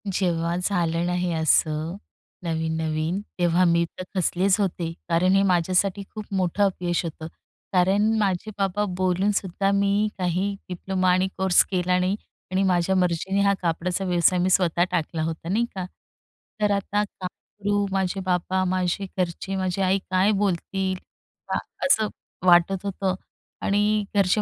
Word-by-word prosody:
जेव्हा 170 -3 0
झालं 175 -3 0
ना 180 - -1
हे 180 0 0
असं 160 +1 +1 0.5
नवीन-नवीन 160 +1 -1 0.2
तेव्हा 175 +1 +3
मी 170 0 +3
तर - - -4
खचलेच 185 +2 +2
होते 175 -4 -1 0.2
कारण 180 +3 +3
हे 195 - +5
माझ्यासाठी 185 +2 +1
खूप 215 -1 -5
मोठं 185 +2 +1
अपयश 180 -3 0
होतं 160 -1 -6 0.5
कारण 195 +4 +3
माझे 200 +1 0
बाबा 200 +1 0
बोलूनसुद्धा 190 +1 +1
मी 200 +1 +2
काही 185 +3 0
डिप्लोमा 185 +1 0
आणि 185 +1 +2
कोर्स 190 -1 +5
केला 180 -1 +1
नाही. 185 +2 +1 0.4
आणि 190 +1 +2
माझ्या 180 +1 +2
मर्जीने 185 +2 +1
हा 200 0 +4
कापडाचा 175 +2 -1
व्यवसाय 180 0 +3
मी 180 +1 +2
स्वतः 175 -2 +3
टाकला 165 -2 -1
होता 165 +1 -4
नाही 225 +5 +2
का? 185 -2 -3 0.8
तर 210 -1 +3
आता 200 +1 0
काय 190 -2 -6
करू, 205 +2 -3
माझे 190 0 0
बाबा, 185 +1 0
माझे 185 +1 0
घरचे, 185 +2 -2
माझी 185 0 -1
आई 190 +1 +2
काय 185 +3 +3
बोलतील 190 0 -1 0.5
का - - -3
हां, - - +1 0.3
असं 220 -6 +4 0.4
वाटत 180 +2 +4
होतं. 190 -1 -1 0.5
आणि 210 +1 +2
घरचे 200 +1 +3
185 Hz, 145 wpm, -24 LUFS, 175-195 Hz, 0.8 s, हे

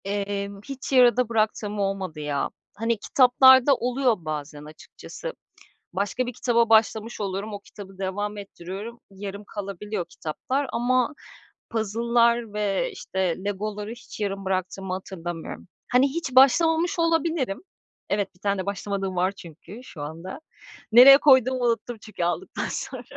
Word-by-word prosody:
Emm, 200 0 -3
hiç 275 -1 -7
yarıda 250 -2 +5
bıraktığım 215 -2 -1
olmadı 195 -5 -2
ya. 145 -2 -2 0.3
Hani, 230 +2 0
kitaplarda 260 +3 +6
oluyor 250 0 +1
bazen 150 -1 -5
açıkçası. 485 - -9 0.6
Başka 205 +7 -1
bir 245 - -5
kitaba 235 -1 +1
başlamış 220 0 +2
oluyorum, 200 +2 -3
o 205 - -5
kitabı 200 -1 -13
devam 205 +2 -3
ettiriyorum, 200 +4 -8
yarım 200 +1 -7
kalabiliyor 200 -1 -5
kitaplar, 260 - -3
ama 250 +3 +1 0.6
puzzle'lar 235 +1 +1
ve 205 -2 -1
işte 190 -3 -2
Lego'ları 205 +1 -3
hiç 240 -1 -11
yarım 195 -2 -3
bıraktığımı 190 0 -2
hatırlamıyorum. 175 -3 -6 0.2
Hani, 250 +3 +5
hiç 275 -3 -4
başlamamış 325 +7 +4
olabilirim. 325 -9 0 0.5
Evet, 200 -2 -1
1 - - -26
tane 200 0 0
de - - -7
başlamadığım 200 -1 -3
var 180 +2 +1
çünkü 190 +4 -12
şu 165 - -10
anda. 165 - -7 0.5
Nereye 255 +4 +10
koyduğumu 260 -3 +4
unuttum 230 0 -1
çünkü 215 -5 -5
aldıktan 175 - -2
sonra. - - -5
210 Hz, 130 wpm, -25 LUFS, 195-245 Hz, 0.6 s, Nereye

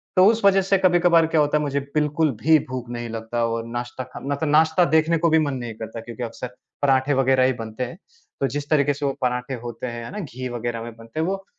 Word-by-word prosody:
तो 185 0 +6
उस 225 +1 +3
वज़ह 195 -1 +6
से 195 +1 +2
कभी-कभार 175 -2 +4
क्या 160 -1 +2
होता 150 +1 +2
है? - - -1
मुझे, 140 -1 -1 0.2
बिल्कुल 150 0 +2
भी 160 +2 +6
भूख 125 -2 -5
नहीं 120 -1 -5
लगता 115 +1 -3
और 115 0 -2
नाश्ता 120 +2 -5
करना 140 +1 -3
तो 140 - -2
नाश्ता 160 +3 +4
देखने 160 +1 +3
को 170 +1 +2
भी 160 0 +4
मन 145 -3 0
नहीं 120 -2 -5
करता, 110 +1 -7
क्योंकि 120 +2 -7
अक्सर 120 +1 -6 0.3
पराठे 135 0 +3
वग़ैरह 130 -1 +3
ही 130 - +2
बनते 115 0 -5
हैं। 125 +6 -6 0.4
तो 135 - +1
जिस 145 +1 -5
तरीके 145 -2 +3
से 145 +1 -4
वो 140 - +2
पराठे 125 +1 -1
होते 120 +1 -5
हैं 120 -1 -6
ना, 210 - -5
घी 130 - -6
वग़ैरह 120 -1 -3
में 115 0 -8
बनते 115 +6 -8
हैं 160 - +1
वो 195 0 -3
135 Hz, 245 wpm, -23 LUFS, 120-160 Hz, 0.4 s, तो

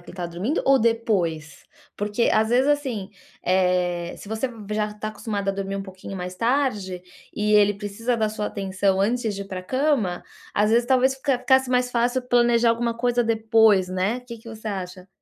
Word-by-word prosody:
que 175 - -21
ele - - -11
está 180 -1 -5
dormindo, 180 - -2
ou 270 0 +5
depois? 190 -10 -1 0.3
Porque, 210 +3 0
às 220 0 +3
vezes, 255 +3 +3
assim, 260 -10 -1 0.3
eh, 180 -2 +1
se 200 - -12
você 220 +4 -1
v 215 -4 -9
já 210 0 0
está 210 +1 -6
acostumada 205 -2 -3
a - - -5
dormir 195 0 -4
um 195 - -3
pouquinho 190 0 -9
mais 180 0 -6
tarde, 210 -6 0 0.3
e 210 0 +1
ele 205 0 +5
precisa 205 +4 -3
da 220 -1 +1
sua 210 -1 -3
atenção 195 -1 -1
antes 225 +1 0
de 200 - -5
ir 195 - -13
para 185 - -5
a - - -14
cama, 255 -7 0 0.3
às 210 +1 +2
vezes, 235 +1 +3
talvez, 260 +1 +3
fica 265 -2 0
ficasse 265 -1 +3
mais 250 0 +1
fácil 245 +2 +1
planejar 240 -1 +3
alguma 230 0 -1
coisa 240 0 +1
depois, 220 -4 +3
né. 185 +6 -1
O - - -11
que 235 -1 -8
que 230 +1 -13
você 220 0 -7
acha? 185 -2 -6
215 Hz, 205 wpm, -23 LUFS, 195-240 Hz, 0.3 s, ou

